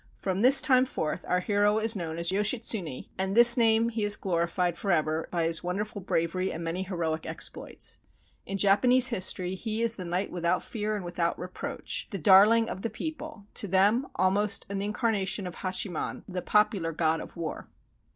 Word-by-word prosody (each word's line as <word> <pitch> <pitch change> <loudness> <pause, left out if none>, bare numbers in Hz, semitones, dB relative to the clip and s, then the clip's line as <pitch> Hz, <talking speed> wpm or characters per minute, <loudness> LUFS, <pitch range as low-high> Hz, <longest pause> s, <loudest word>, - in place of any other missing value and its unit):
From 190 0 -3
this 265 +3 +7
time 255 -2 +4
forth 155 -10 -4
our 180 0 +1
hero 205 +2 +1
is 220 +1 +2
known 165 -4 -5
as 170 +1 +3
Yoshitsune, 210 - 0
and 190 +2 -1
this 240 0 +9
name 230 -1 +3
he 225 -1 -4
has 205 0 +4
glorified 175 -1 -1
forever 160 -4 -1
by 170 -2 -1
his 165 0 -1
wonderful 205 +4 -4
bravery 185 +1 -1
and 165 - -6
many 165 +3 -3
heroic 170 -4 -3
ex - - -1
ploits. - - -4 0.4
In 195 - -5
Japanese 245 +6 +5
history 185 -4 +1
he 220 +3 -3
is 230 0 0
the 185 - -6
knight 180 +3 -3
without 175 0 -1
fear 215 -1 -3
and 200 -4 -6
without 175 -1 -2
reproach, 180 +1 -6
the 205 - -4
darling 205 +6 +5
of 190 - -6
the 230 - -3
people, 305 -1 -7
to 205 - -1
them 205 +8 +2
almost 200 +3 +1
an 200 -1 -3
incarnation 205 -2 -1
of 180 - -7
Hachiman, 185 -2 -3
the 185 -1 -5
popular 200 -6 +1
God 160 0 0
of - - -11
War. 165 -2 -6
195 Hz, 180 wpm, -27 LUFS, 175-220 Hz, 0.4 s, this